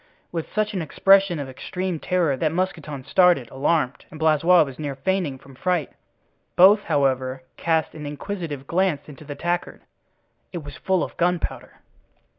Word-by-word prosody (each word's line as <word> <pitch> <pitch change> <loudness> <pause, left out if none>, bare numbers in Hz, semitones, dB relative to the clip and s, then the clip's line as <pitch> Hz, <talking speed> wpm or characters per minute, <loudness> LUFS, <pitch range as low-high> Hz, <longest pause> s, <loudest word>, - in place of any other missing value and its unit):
with 165 -2 -4
such 215 0 0
an 185 - -2
expression 195 +3 +4
of 140 -2 -4
extreme 180 +6 -4
terror 170 -6 +1
that 155 +3 0
Mousqueton 160 -6 -3
started, 180 -9 +4
alarmed, 140 0 0
and 155 - -11
Blaisois 160 +2 +5
was 135 -2 -9
near 145 -3 -3
fainting 160 -1 -1
from 135 +1 -16
fright. 175 +2 -1 0.6
Both, 205 +4 +6
however, 130 -2 0
cast 160 -2 0
an 150 -2 -7
inquisitive 150 -2 -5
glance 175 -3 0
into 150 +1 -12
the 145 0 -6
tankard—it 175 +1 -6
was 145 -1 -9
full 190 -2 0
of - - -6
gunpowder. 175 0 -2
160 Hz, 150 wpm, -23 LUFS, 140-180 Hz, 0.6 s, Both